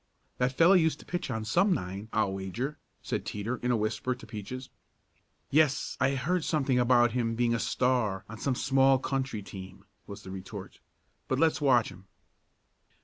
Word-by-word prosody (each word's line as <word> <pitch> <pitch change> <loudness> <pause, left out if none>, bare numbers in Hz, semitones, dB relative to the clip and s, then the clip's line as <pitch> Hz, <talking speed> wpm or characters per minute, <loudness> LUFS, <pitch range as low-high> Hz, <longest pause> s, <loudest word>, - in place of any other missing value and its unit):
"That 125 0 +2
fellow 170 +3 +7
used 160 -5 +3
to - - -16
pitch 175 -5 -3
on 110 -3 -3
some 180 - +3
nine, 95 +4 -5
I'll 105 -3 +1
wager," 105 +10 -4 0.2
said - - -2
Teeter 110 +5 -3
in 125 - -3
a 120 - +3
whisper 110 +4 -1
to 125 - -13
Peaches. 125 +4 -7 0.8
"Yes, 145 -1 +2
I 135 +1 +2
heard 165 +6 0
something 135 -6 +1
about 120 -1 +4
him 115 -1 -1
being 120 0 +2
a 115 - 0
star 115 -7 0
on 110 0 -9
some 135 -2 0
small 135 +1 +4
country 130 -5 -2
team," 95 0 -10 0.2
was 100 0 -9
the 95 - -8
retort. 95 +1 -8 0.5
"But 130 - 0
let's 160 +1 +2
watch 125 -5 +4
him." 95 0 -14
125 Hz, 175 wpm, -29 LUFS, 105-135 Hz, 0.8 s, fellow